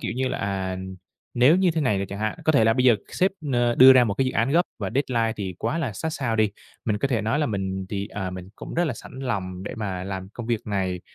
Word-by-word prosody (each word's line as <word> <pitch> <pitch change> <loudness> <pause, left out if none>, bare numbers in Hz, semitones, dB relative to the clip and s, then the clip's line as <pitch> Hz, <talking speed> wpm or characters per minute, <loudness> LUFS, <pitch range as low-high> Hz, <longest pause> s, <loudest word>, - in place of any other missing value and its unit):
kiểu - - -3
như 130 0 0
là, - - -3
à, 95 -2 -2 0.6
nếu 130 +8 +6
như 185 -1 +3
thế 160 -1 -1
này 125 -9 +2
rồi 95 - -2
chẳng 100 - -7
hạn, 110 0 -2
có 155 - +4
thể 125 -7 +4
là 115 - +5
bây 125 +2 +1
giờ 120 -3 +6
sếp, 190 +2 +1 0.2
ơ, 120 -1 +2
đưa 130 +2 +9
ra 130 -1 +6
một 105 -4 -1
cái 135 - +1
dự 130 - -1
án 115 +3 +1
gấp 170 +4 +4 0.2
và 100 -3 -3
deadline 120 -5 +1
thì 95 -3 -4
quá 165 - -1
là 135 -9 -2
sát 130 +11 -3
sao 130 -7 -2
đi, 110 -2 +3 0.3
mình 105 -2 0
có 140 - 0
thể 120 -5 +1
nói 115 +6 0
là 150 - +1
mình 95 -3 -3
thì, 100 0 -3
à, 95 -3 -4
mình 90 0 -8
cũng - - -8
rất 175 +1 +2
là 140 - -1
sẵn - - -12
lòng 95 -8 -3
để - - -6
mà 95 -5 -3
làm 95 -1 -5
công 120 0 -7
việc 115 -2 0
này, 95 -3 -1
110 Hz, 285 wpm, -24 LUFS, 100-130 Hz, 0.6 s, đưa